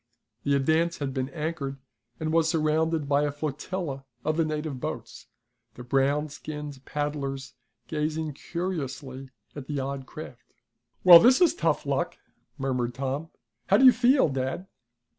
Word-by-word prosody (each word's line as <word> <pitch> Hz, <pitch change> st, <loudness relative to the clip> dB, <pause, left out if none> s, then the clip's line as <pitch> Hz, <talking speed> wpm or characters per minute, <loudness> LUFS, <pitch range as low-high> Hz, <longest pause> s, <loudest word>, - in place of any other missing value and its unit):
The 140 Hz, 0 st, +2 dB
Advance 160 Hz, +5 st, +2 dB
had 140 Hz, -2 st, -3 dB
been 130 Hz, 0 st, -2 dB
anchored, 150 Hz, -2 st, -4 dB, 0.4 s
and 155 Hz, 0 st, -2 dB
was 165 Hz, -1 st, +3 dB
surrounded 160 Hz, -1 st, +1 dB
by 140 Hz, 0 st, +3 dB
a 145 Hz, -1 st, 0 dB
flotilla 145 Hz, 0 st, -4 dB, 0.2 s
of 155 Hz, 0 st, +1 dB
the 165 Hz, -, +2 dB
native 155 Hz, -3 st, -3 dB
boats, -, -, -6 dB, 0.5 s
the 125 Hz, -, -9 dB
brown 140 Hz, +4 st, +1 dB
skinned 150 Hz, -2 st, -7 dB
paddlers 140 Hz, -2 st, -3 dB, 0.3 s
gazing 155 Hz, 0 st, -2 dB
curiously 140 Hz, -6 st, -5 dB, 0.3 s
at 140 Hz, -3 st, -7 dB
the 145 Hz, -2 st, -2 dB
odd 135 Hz, 0 st, -4 dB
craft. 140 Hz, -6 st, -11 dB, 0.5 s
"Well, 175 Hz, -2 st, +11 dB
this 250 Hz, +5 st, +6 dB
is 340 Hz, -3 st, +5 dB
tough 350 Hz, -, 0 dB
luck!" -, -, -1 dB, 0.4 s
murmured 125 Hz, -3 st, -1 dB
Tom. 140 Hz, +5 st, -3 dB, 0.4 s
"How 200 Hz, -, +5 dB
do 265 Hz, -, +5 dB
you 255 Hz, -, +11 dB
feel, 250 Hz, +1 st, +4 dB
dad?" 135 Hz, +6 st, -3 dB
150 Hz, 145 wpm, -27 LUFS, 135-160 Hz, 0.5 s, Well